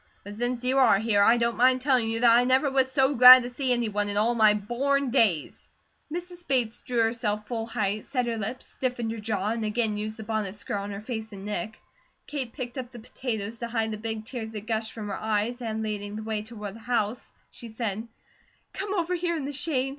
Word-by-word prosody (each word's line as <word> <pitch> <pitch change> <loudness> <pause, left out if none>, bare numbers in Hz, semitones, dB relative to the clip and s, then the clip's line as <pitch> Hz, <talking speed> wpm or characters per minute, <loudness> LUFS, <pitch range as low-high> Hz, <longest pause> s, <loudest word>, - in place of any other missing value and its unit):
But 205 - -8
since 245 +3 -2
you 260 +2 +2
are 255 -6 +6
here, 210 -1 +2
I 230 +4 +5
don't 235 0 0
mind 255 +2 +4
telling 255 -4 +2
you 225 +1 -2
that 235 -1 +6
I 240 - +5
never 260 +3 +2
was 265 -1 +2
so 270 0 +3
glad 255 0 +10
to 245 - -5
see 260 +1 -1
any 240 -2 +2
one 205 -1 -1
in 205 - -2
all 225 +3 +3
my 215 -3 +5
born 260 +6 0
days." 210 - +1 0.4
Mrs. 350 +1 -6
Bates 245 -5 0
drew 240 -2 0
herself 220 -2 -1
full 225 -2 -3
height, 210 -1 -2
set 255 -3 -1
her 235 -1 -2
lips, 225 +4 -5
stiffened 245 -3 -3
her 225 - -5
jaw, 210 -2 -2
and 225 0 -2
again 215 0 0
used 215 +1 -4
the 220 - -7
bonnet 215 -2 -3
skirt 205 0 -3
on 200 0 -4
her 200 0 -6
face 220 -1 -5
and 195 0 -9
neck. 210 +1 -4 0.5
Kate 265 -5 -4
picked 250 -1 -6
up 250 -1 -7
the 245 - -11
potatoes, 225 -2 -5
to 235 - -3
hide 225 -1 -1
the 215 - -4
big 220 -1 -4
tears 225 -2 -6
that 210 -1 -6
gushed 220 -1 -2
from 215 -2 -7
her 195 - -4
eyes, 220 +3 -1
and 220 -2 -3
leading 205 -1 -4
the 215 - -5
way 215 -1 -2
toward 210 -2 -8
the 225 - -12
house 230 0 -2 0.2
she 235 - -10
said: 220 -1 -4 0.7
"Come 395 +1 -3
over 350 -1 0
here 345 -1 -1
in 285 - -4
the 285 - -4
shade. 270 -3 0
230 Hz, 235 wpm, -26 LUFS, 215-255 Hz, 0.7 s, glad